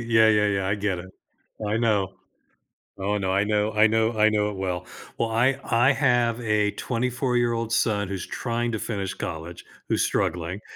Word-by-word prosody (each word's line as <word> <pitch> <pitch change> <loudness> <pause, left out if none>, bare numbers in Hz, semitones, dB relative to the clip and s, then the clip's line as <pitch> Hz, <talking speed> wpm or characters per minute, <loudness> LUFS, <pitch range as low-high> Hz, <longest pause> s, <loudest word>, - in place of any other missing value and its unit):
yeah, 110 -1 +5
yeah, 105 -1 +4
yeah, 100 -2 0
I 100 - +2
get 100 -3 -1
it. 95 +1 -9 0.6
I 105 +2 0
know. 105 -5 +1 0.8
Oh 100 +2 -1
no, 95 -1 -1
I 100 +1 +2
know 105 0 0
I 110 +1 +5
know 110 +1 +1
I 110 0 +5
know 105 -1 +1
it 100 - -6
well. 90 -2 -3 0.3
Well, 115 - 0
I 125 +4 +2
I 120 +4 +3
have 120 -4 +2
a 105 -3 +1
twenty-four-year-old 120 -2 -1
son 105 -4 +1
who's 95 -2 -4
trying 120 -1 -2
to 110 - -3
finish 100 -4 -3
college, 80 +2 -6 0.2
who's - - +2
struggling, 85 +4 -2
105 Hz, 180 wpm, -25 LUFS, 100-115 Hz, 0.8 s, yeah